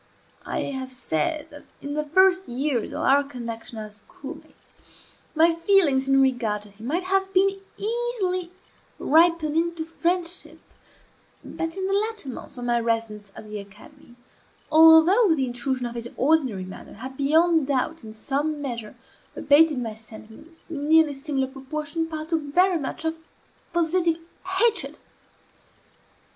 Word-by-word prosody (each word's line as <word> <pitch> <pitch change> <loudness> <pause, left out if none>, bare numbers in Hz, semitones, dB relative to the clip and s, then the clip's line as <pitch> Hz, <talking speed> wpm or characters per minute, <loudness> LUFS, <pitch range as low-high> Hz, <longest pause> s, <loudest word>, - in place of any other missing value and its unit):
I - - -2
have 265 -2 -5
said 255 - -2
that, 290 0 -13
in 285 +1 -6
the 300 +1 -1
first 375 +5 +3
years 250 -1 -1
of - - -4
our 280 +2 +4
connection 235 -4 -8
as 215 -1 -8
schoolmates, 275 +8 -13 0.6
my 330 +2 +5
feelings 330 -6 +3
in 270 0 +5
regard 230 -6 0
to 210 - -15
him 215 +4 -10
might 340 +6 -1
have 385 +1 0
been 390 +1 +3 0.2
easily 415 -6 -2 0.5
ripened 320 -1 +3
into 335 0 -1
friendship; 345 +1 -3 0.9
but, 330 +2 -5
in 380 - -2
the 390 - -1
latter 425 -6 -2
months 255 - -9
of 245 - -5
my 240 0 +2
residence 225 -3 -2
at 215 - -10
the 210 0 -6
academy, 200 +4 -15 0.6
although 325 +5 +7
the 270 -3 0
intrusion 250 +1 -3
of 240 - -5
his 235 0 -6
ordinary 260 -10 +1
manner 185 - -11
had, 260 +5 -8
beyond 315 +2 +3
doubt, 285 +3 -1
in 220 - -9
some 285 +7 -2
measure 235 -6 -6 0.4
abated, 300 0 +4
my 230 -3 -3
sentiments, 220 +10 -15
in 290 -1 -4
nearly 320 -2 +5
similar 275 -1 -1
proportion, 300 +4 -4
partook 320 0 -3
very 350 +5 +2
much 290 +3 -5
of 320 0 -2 0.5
positive 340 0 +1 0.4
hatred. 455 +2 +1
295 Hz, 145 wpm, -24 LUFS, 245-335 Hz, 0.9 s, although